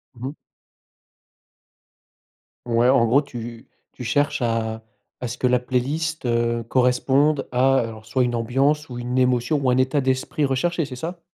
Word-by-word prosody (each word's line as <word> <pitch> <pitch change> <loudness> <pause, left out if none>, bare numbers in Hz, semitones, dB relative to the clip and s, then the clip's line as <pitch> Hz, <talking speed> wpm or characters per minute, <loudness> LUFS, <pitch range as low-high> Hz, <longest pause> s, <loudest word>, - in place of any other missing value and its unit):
Mmh 125 +2 -6
mh. 140 - -5 2.3
Ouais, 120 +1 +3
en 130 -3 +4
gros 135 +6 +4
tu 120 -4 -8 0.2
tu 125 - -9
cherches 145 +4 0
à 115 -1 -1 0.4
à 125 - -4
ce 120 - -6
que - - -2
la 125 0 +3
playlist, 145 +6 -2
heu, 120 0 0
corresponde 130 +4 +2
à 130 +2 +3
alors, 110 -3 -3
soit 125 +4 +1
une 120 -1 -1
ambiance, 135 +6 +1
ou, 125 - -7
une 120 +1 -3
émotion, 125 +3 +2
ou, 130 - +2
un 125 - +2
état 130 +2 +2
d'esprit 130 +3 0
recherché, 165 +6 0
c'est 135 -2 -8
ça? 170 +6 -6
125 Hz, 165 wpm, -22 LUFS, 120-140 Hz, 2.3 s, en